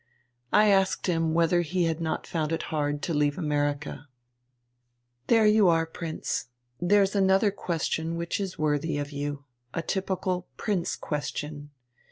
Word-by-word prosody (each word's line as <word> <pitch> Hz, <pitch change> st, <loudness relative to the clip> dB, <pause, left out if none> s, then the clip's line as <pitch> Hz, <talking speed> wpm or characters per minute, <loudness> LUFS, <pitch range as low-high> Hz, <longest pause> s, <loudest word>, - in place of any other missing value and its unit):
"I 210 Hz, 0 st, +5 dB
asked 195 Hz, -1 st, +2 dB
him 165 Hz, -3 st, +1 dB
whether 170 Hz, +1 st, +3 dB
he 175 Hz, +2 st, 0 dB
had 165 Hz, 0 st, 0 dB
not 160 Hz, -1 st, -2 dB
found 160 Hz, -2 st, -2 dB
it 165 Hz, -, -1 dB
hard 145 Hz, -1 st, -1 dB
to 170 Hz, -, -1 dB
leave 145 Hz, -1 st, +1 dB
America." 145 Hz, -2 st, -2 dB, 1.2 s
"There 225 Hz, -2 st, +5 dB
you 210 Hz, -2 st, +5 dB
are, 165 Hz, -1 st, +3 dB
Prince, 160 Hz, 0 st, -4 dB, 0.3 s
there's 195 Hz, +2 st, +3 dB
another 195 Hz, +1 st, +4 dB
question 165 Hz, -3 st, -2 dB
which 170 Hz, +3 st, -2 dB
is 195 Hz, -2 st, -4 dB
worthy 150 Hz, 0 st, 0 dB
of 145 Hz, 0 st, -3 dB
you, 145 Hz, 0 st, -4 dB, 0.3 s
a 165 Hz, -, -1 dB
typical 185 Hz, -2 st, -2 dB
Prince 195 Hz, -6 st, -1 dB
question. 145 Hz, +1 st, -4 dB
165 Hz, 145 wpm, -27 LUFS, 150-190 Hz, 1.2 s, I